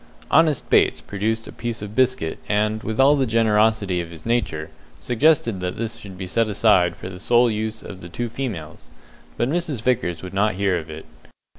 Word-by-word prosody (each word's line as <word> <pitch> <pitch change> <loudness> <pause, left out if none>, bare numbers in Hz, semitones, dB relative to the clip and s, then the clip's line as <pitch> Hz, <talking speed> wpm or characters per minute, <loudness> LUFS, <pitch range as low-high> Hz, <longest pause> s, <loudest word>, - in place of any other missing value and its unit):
Honest 160 -4 +3
Bates - - +3
produced 110 +3 -3
a - - -8
piece 120 -2 -5
of 105 0 -7
biscuit, 130 -9 +1
and, 105 +1 +1
with 110 +1 -4
all 140 +2 +6
the 135 -3 +1
generosity 110 -4 +2
of 85 - -7
his 85 -2 -12
nature, 85 -10 -1 0.3
suggested 120 -5 +2
that 90 0 -4
this 115 0 -4
should 95 -2 -10
be 95 - -5
set 115 +5 +1
aside 95 -5 +3
for - - -8
the 90 -1 -8
sole 120 +3 +3
use 110 +1 -3
of 95 -2 -9
the 85 - -9
two 120 +7 -3
females, 110 - -6 0.5
but 120 - +1
Mrs. 150 -6 -2
Vickers 115 -10 0
would 95 0 -7
not 100 0 +1
hear 100 -1 +1
of 80 0 -10
it. 80 0 -8
110 Hz, 195 wpm, -22 LUFS, 95-120 Hz, 0.5 s, all